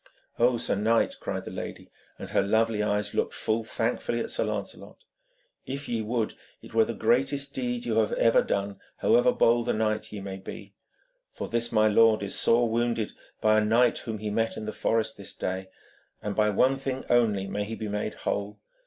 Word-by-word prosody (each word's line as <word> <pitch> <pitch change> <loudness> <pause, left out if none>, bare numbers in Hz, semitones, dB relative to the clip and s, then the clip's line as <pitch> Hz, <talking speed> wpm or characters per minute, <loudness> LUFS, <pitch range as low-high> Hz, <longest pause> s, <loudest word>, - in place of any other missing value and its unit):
'Oh, 120 +1 +4
sir - - 0
knight!' 110 +3 +2
cried - - -4
the - - -6
lady, - - -7 0.3
and - - -8
her - - +3
lovely 110 +1 +2
eyes 105 -1 0
looked - - -1
full 110 +1 0
thankfully 115 +1 -1
at - - -3
Sir - - 0
Lancelot, - - -5 0.7
'if 140 +2 -5
ye 115 -2 -1
would, 110 0 -1 0.3
it - - -13
were 115 -1 +5
the 115 - -4
greatest 140 +2 +1
deed 125 -2 -2
you 115 -1 +2
have 110 - +1
ever 115 - +4
done, 100 0 -2 0.2
however 245 +2 +4
bold 120 - +3
a - - +3
knight 110 0 -1
ye 105 - -6
may 95 -1 -6
be. 95 - -9 0.6
For - - -5
this 115 0 -1
my 110 -1 +4
lord 110 0 +4
is 100 - -4
sore 120 +1 +3
wounded 115 -1 0 0.3
by 110 0 +4
a - - +1
knight 115 +3 +3
whom 110 -2 -5
he 105 0 -4
met 115 +1 0
in 110 - -5
the 110 - -4
forest 115 -1 0
this - - -8
day, 95 0 -3 0.5
and 105 -1 -4
by 105 0 +3
one 130 +6 +3
thing 135 -1 -4
only 110 -5 +2
may 100 +1 -2
he 110 +2 -5
be 110 - -5
made 105 +1 -3
whole. 100 +1 -3
110 Hz, 200 wpm, -27 LUFS, 105-120 Hz, 0.7 s, were